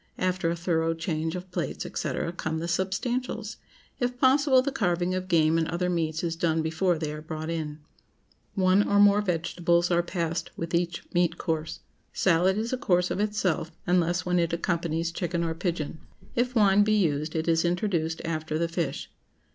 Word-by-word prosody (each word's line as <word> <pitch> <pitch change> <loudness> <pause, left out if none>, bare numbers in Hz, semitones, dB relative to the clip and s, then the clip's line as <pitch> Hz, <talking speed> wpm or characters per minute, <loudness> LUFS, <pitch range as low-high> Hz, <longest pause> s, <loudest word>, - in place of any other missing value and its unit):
After 185 -2 0
a 170 - 0
thorough 165 -1 0
change 160 0 -2
of 180 0 -7
plates, - - -3
&c., - - -3 0.2
come 160 0 -2
the 165 +1 -3
substantials. 220 +5 -2 0.4
If 245 0 -1
possible, 260 0 +4
the 280 - -1
carving 180 -6 0
of 185 0 -3
game 165 -2 +3
and 160 - 0
other 180 +2 -1
meats 160 -2 -1
is 165 -1 -1
done 165 -1 +1
before 165 +2 +1
they 155 -1 -3
are 150 - -7
brought 155 +1 -5
in. 155 -2 -3 0.8
One 190 0 +4
or 205 - +1
more 205 0 +6
vegetables 175 -1 +1
are 170 0 +4
passed 170 -1 -3
with 165 +1 -5
each 175 0 0
meat 175 -1 +2
course. 160 -1 -3 0.3
Salad 185 +2 +3
is 225 +3 -2
a - - +1
course 180 -8 +2
of - - -2
itself, 200 -6 0
unless 175 -1 +1
when 180 0 +2
it 170 -1 0
accompanies 170 -1 -1
chicken 170 0 -2
or 165 -1 -1
pigeon. 165 -2 -3 0.4
If 250 +1 0
wine 205 -2 +5
be 215 +1 +2
used, 155 -5 0
it 160 +1 -1
is 165 -1 +3
introduced 170 -2 0
after 155 -1 -2
the 170 +1 0
fish. 170 -2 -3
170 Hz, 180 wpm, -27 LUFS, 165-190 Hz, 0.8 s, more